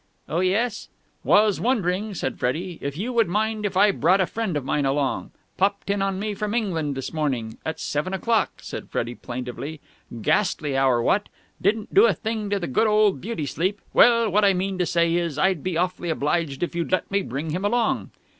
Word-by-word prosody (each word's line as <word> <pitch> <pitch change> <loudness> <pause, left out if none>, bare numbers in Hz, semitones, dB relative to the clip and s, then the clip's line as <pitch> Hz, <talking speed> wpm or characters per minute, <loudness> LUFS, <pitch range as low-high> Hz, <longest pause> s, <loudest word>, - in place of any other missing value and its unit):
"Oh, 165 - -1
yes?" 210 +5 0 0.3
"Was 210 -1 +4
wondering," 210 -4 0
said 130 -6 -3
Freddie, 165 +8 -2
"if 140 +1 -4
you 235 +7 -3
would 230 -4 +3
mind 215 +3 0
if 190 -2 -4
I 205 +1 +6
brought 185 +1 +3
a 190 - +3
friend 215 -5 -2
of 140 - -4
mine 145 +1 0
along? 135 0 0 0.3
Popped 200 +1 +1
in 200 0 0
on 195 -1 0
me 210 +1 -2
from 210 +2 -3
England 165 - -1
this 135 - -5
morning. 130 -8 -2
At 160 - -4
seven 150 +6 -2
o'clock," 225 +3 +1
said - - -7
Freddie 120 +1 -2
plaintively. 125 +6 -6 0.4
"Ghastly 160 -8 +1
hour, 130 -3 +3
what? 205 - +1 0.3
Didn't 210 +2 0
do 410 +4 +7
a - - +2
thing 220 -2 -3
to 205 - +1
the 185 - -3
good 170 - +2
old 210 -7 +3
beauty 205 -6 -3
sleep! 185 +8 -1
Well, 235 -1 +6
what 210 +3 +3
I 195 -2 +5
mean 190 +1 -2
to 180 - +1
say 170 -1 +2
is, 170 -4 -1
I'd 185 0 +2
be 180 0 -2
awfully 180 0 -1
obliged 150 -1 -1
if 175 - -2
you'd 170 0 -2
let 185 - 0
me 200 0 +2
bring 145 +1 -4
him 180 +5 -2
along." 230 +3 +1
185 Hz, 205 wpm, -24 LUFS, 155-210 Hz, 0.4 s, do